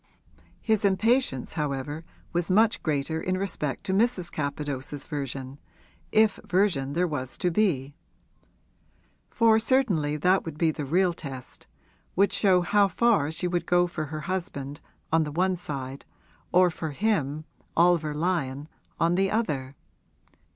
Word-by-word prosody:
His 220 -2 +1
impatience 200 - +1
however 150 0 -3 0.3
was 175 +1 0
much 215 +4 +3
greater 155 +1 -1
in 185 0 -1
respect 165 -8 -2
to 190 - -2
Mrs. 200 -4 +1
Capadose's 145 -1 -4
version, 135 -1 -5 0.5
if 215 -1 +3
version 175 -8 +1
there 175 +3 +2
was 130 -6 -4
to 180 - 0
be; 155 -8 +1 1.4
for 225 -1 +4
certainly 205 - +1
that 180 +5 +3
would 160 -2 -7
be 160 0 +2
the 150 -1 -5
real 175 +5 +2
test, 135 -6 -9 0.5
would 200 +1 +3
show 185 -3 +4
how 200 +3 +3
far 200 -5 +2
she 170 +3 -2
would 175 -1 -2
go 175 0 +4
for 170 -3 -4
her 155 +1 -6
husband, 150 -6 -4 0.3
on 165 - +5
the 150 -1 -2
one 185 +4 +1
side, 135 -5 -6 0.5
or 180 0 +5
for 160 0 -5
him, 155 -6 0 0.3
Oliver 165 -3 +3
Lyon, 150 -4 -1 0.3
on 170 +1 +3
the 195 +2 +2
other. 145 - -2
165 Hz, 140 wpm, -27 LUFS, 145-190 Hz, 1.4 s, on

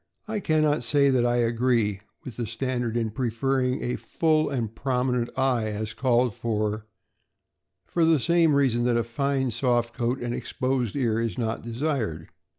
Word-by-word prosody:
I 215 -1 -2
can 155 -4 +1
not 150 -3 +2
say 140 +3 +3
that 125 -2 +2
I 120 - +1
agree 115 -3 +1 0.2
with 125 - -8
the 120 -2 -3
standard 120 0 -2
in 115 -2 -1
pref 115 0 -4
er 135 0 +3
ring 125 0 0
a 125 - -2 0.2
"lull 155 -1 +3
and 115 -6 -3
prominent 125 -1 0
" - - -23
eye, 125 -4 +1
as 110 0 -4
called 125 -2 +2
for, 110 -1 -2 1.0
for 170 - 0
the 160 -2 +4
same 165 0 +3
reason 125 -4 +2
that 120 -1 +2
a 115 - +1
fine, 135 +1 -1
soft 120 0 0
coat 120 +1 -1
and 120 0 -2
exposed 130 -4 -2
ear 115 -5 +1
is 115 0 -2
not 115 -2 -2
desired. 115 - -3
120 Hz, 180 wpm, -26 LUFS, 115-135 Hz, 1.0 s, the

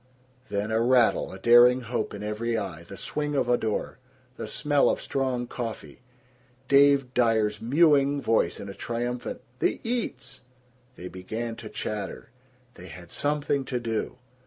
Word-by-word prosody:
Then 105 +2 -2
a 110 +1 +2
rattle, 120 -1 +3
a 95 - -8
daring 120 +4 +6
hope 120 -2 -3
in 100 - -7
every 115 +2 -2
eye, 85 -6 -5
the 100 +3 -10
swinging 150 -1 -3
of 135 - +1
a 120 - +4
door, 110 -3 -3 0.4
the - - -6
smell 145 -1 +2
of - - 0
strong 130 -2 -1
coffee, 120 -2 -6 0.7
Dave 140 -2 +4
Dyer's 110 -3 +2
mewing 140 +2 +4
voice 110 -9 +1
in 100 - -7
a 100 - -6
triumphant, 120 +3 -4 0.2
"The - - +1
eats!" 235 0 -4 0.5
They 90 - -8
began 110 +6 -5
to 115 -2 -8
chatter. 105 0 -5 0.4
They 90 - -12
had 85 +1 -12
something 145 -1 0
to 125 -1 -2
do. 115 +1 -3
120 Hz, 155 wpm, -26 LUFS, 105-135 Hz, 0.7 s, daring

